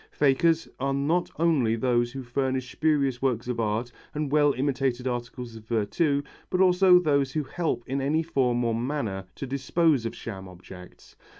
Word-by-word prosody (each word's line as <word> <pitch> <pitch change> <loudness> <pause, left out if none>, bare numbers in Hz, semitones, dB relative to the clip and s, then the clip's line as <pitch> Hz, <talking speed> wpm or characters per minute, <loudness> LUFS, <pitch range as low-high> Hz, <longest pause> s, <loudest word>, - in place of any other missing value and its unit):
Fakers 155 +4 +2
are 135 +1 0
not 160 +6 0
only 150 -9 +2
those 120 0 +1
who 135 -1 -6
furnish 130 +1 -2
spurious 140 -5 +1
works 125 -3 0
of 125 -2 -2
art 115 +2 -1 0.2
and 150 -2 -2
well 145 -1 +4
imitated 130 -1 -1
articles 120 -1 -5
of 110 -1 -12
virtu, 140 +7 0 0.3
but 180 - -1
also 185 0 +6
those 140 -6 +1
who 155 - 0
help 150 -2 -2
in 135 +2 -2
any 155 +4 +1
form 125 -6 +1
or 115 -1 +1
manner 115 -6 -3
to - - -5
dispose 140 0 +1
of - - -7
sham 95 -4 -7
objects. 90 0 -13
135 Hz, 170 wpm, -26 LUFS, 120-150 Hz, 0.3 s, also